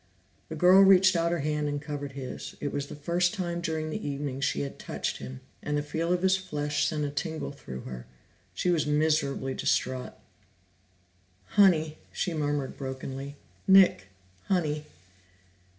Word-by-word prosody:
The 160 - -5
girl 180 +4 +7
reached 190 -1 +7
out 170 0 +2
her 170 -3 0
hand 150 0 -1
and 145 0 -2
covered 145 -2 -5
his; 130 -2 -7
it 145 - -3
was 140 0 -2
the - - -8
first 175 +6 0
time 175 -3 -2
during 160 -2 -2
the - - -4
evening 140 -1 -3
that - - -6
she - - 0
had 140 -1 -5
touched - - -3
him, 65 -1 -8 0.2
and 150 0 -1
the 145 - -1
feel 165 +3 -2
of 180 0 +1
his 190 0 +5
flesh 150 -6 -1
sent 150 -2 -1
a 145 - -3
tingle 160 +2 -3
through 65 - -8
her. 60 -1 -8 0.5
She 180 - +1
was 160 -4 +1
miserably 150 -3 +1
distraught. 130 -1 -1 1.4
"Honey," 160 -6 +4
she 180 - -2
murmured 145 -3 -2
brokenly. 135 +1 -6 0.3
"Nick, 190 - +6 0.4
Honey." 155 -5 0
150 Hz, 165 wpm, -28 LUFS, 140-170 Hz, 1.4 s, girl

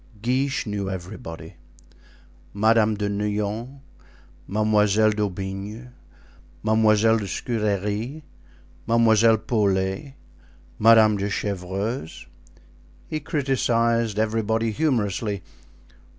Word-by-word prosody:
Guiche 130 +5 0
knew 100 -2 -3
everybody—Madame 100 +4 -3
de 105 0 -2
Neuillan, 105 +5 -3 0.7
Mademoiselle 105 0 +3
d'Aubigne, 100 +3 -4 0.7
Mademoiselle 110 0 +3
de 100 - -5
Scudery, 105 - -2 0.6
Mademoiselle 115 -1 +4
Paulet, 100 +3 -1 0.6
Madame 110 -2 +6
de 100 +1 -2
Chevreuse. 100 +1 -4 0.8
He 155 - -2
criticised 115 -6 0
everybody 110 +1 0
humorously. 105 - -1
110 Hz, 70 wpm, -24 LUFS, 100-115 Hz, 0.8 s, Madame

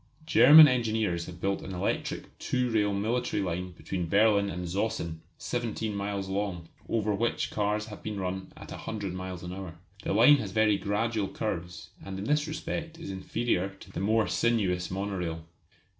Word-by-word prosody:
German 155 0 +9
engineers 110 -9 0
have 90 -1 -9
built 100 +2 -1
an 95 - -6
electric 90 - -3
two 125 -1 0
rail 105 -2 +2
military 115 +5 -1
line 90 0 -3
between 90 0 -4
Berlin 100 0 +4
and 90 0 -4
Zossen, 85 -3 -2 0.2
seventeen 115 -3 -3
miles 100 -1 -3
long, 95 -4 -3 0.2
over 110 -2 +1
which 115 +4 -1
cars 105 0 0
have 105 -1 -10
been 105 -2 -4
run 95 0 -4
at - - -11
a - - -6
hundred 100 -4 -4
miles 90 -1 -6
an 90 0 -5
hour. 95 -4 -7 0.2
The - - -3
line 125 +8 +7
has 100 -8 -5
very 110 -1 +4
gradual 105 0 0
curves, 90 -6 -5
and 95 -1 -6
in 100 - -4
this 150 +3 +1
respect 160 +1 -4
is 165 - -7
inferior 95 0 -1
to - - -13
the - - -5
more 110 +3 +2
sinuous 95 -7 +1
monorail. 90 -4 -3
100 Hz, 175 wpm, -29 LUFS, 90-110 Hz, 0.2 s, German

